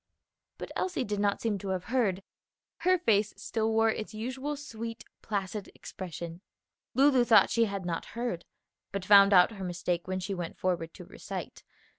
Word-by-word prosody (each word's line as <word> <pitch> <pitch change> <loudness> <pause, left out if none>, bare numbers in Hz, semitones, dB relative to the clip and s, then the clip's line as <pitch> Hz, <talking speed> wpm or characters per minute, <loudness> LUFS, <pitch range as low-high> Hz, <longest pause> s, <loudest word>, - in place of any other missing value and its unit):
But - - -7
Elsie 360 -8 -1
did 205 -3 -3
not 200 -1 +1
seem 215 -3 0
to 195 - -7
have 185 -1 -1
heard; 205 -6 0 0.5
her 370 +1 +3
face 215 - +2
still 225 -1 -1
wore 225 0 +4
its 215 0 -5
usual 260 +6 -3
sweet, 230 -5 -7 0.2
placid 200 -1 -3
expression. 170 -1 -7 0.5
Lulu 270 -2 +5
thought 220 -4 +6
she 230 0 +3
had 200 -3 -4
not 170 -2 -2
heard, 235 -8 -2 0.5
but 195 -2 -4
found 200 0 +8
out 180 +1 +7
her 200 -3 -7
mistake 175 -1 -2
when 185 0 -2
she 190 +2 -3
went 175 -3 -5
forward 175 -3 -1
to - - -10
recite. - - -7
205 Hz, 170 wpm, -30 LUFS, 185-230 Hz, 0.5 s, found